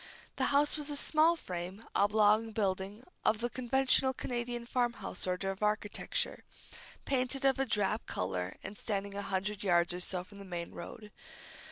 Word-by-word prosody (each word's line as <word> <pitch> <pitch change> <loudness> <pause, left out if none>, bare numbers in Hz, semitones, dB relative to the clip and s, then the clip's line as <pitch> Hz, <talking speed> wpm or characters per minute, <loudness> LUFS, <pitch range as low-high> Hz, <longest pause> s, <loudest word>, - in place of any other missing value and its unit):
The - - +2
house 290 +2 +3
was 300 -1 -4
a 290 - -2
small 315 +3 +4
frame, 185 - -6
oblong 210 +2 +4
building, 200 +2 -1 0.2
of 215 - +3
the 240 +2 -2
conventional 260 +1 +2
Canadian 240 -1 -3
farm 240 0 +1
house 185 - -3
order 185 +1 0
of 195 - -8
architecture, 210 0 -1 0.6
painted 270 0 0
of 270 -1 +4
a 270 - +2
drab 210 0 +1
color 90 0 -2
and 195 - -6
standing 200 -2 -2
a 200 - -3
hundred 200 +1 -2
yards 175 -3 +3
or 180 - -4
so 180 0 -2
from 200 +2 -14
the - - -8
main 175 -3 -5
road. 210 +4 -9
210 Hz, 170 wpm, -33 LUFS, 190-245 Hz, 0.6 s, small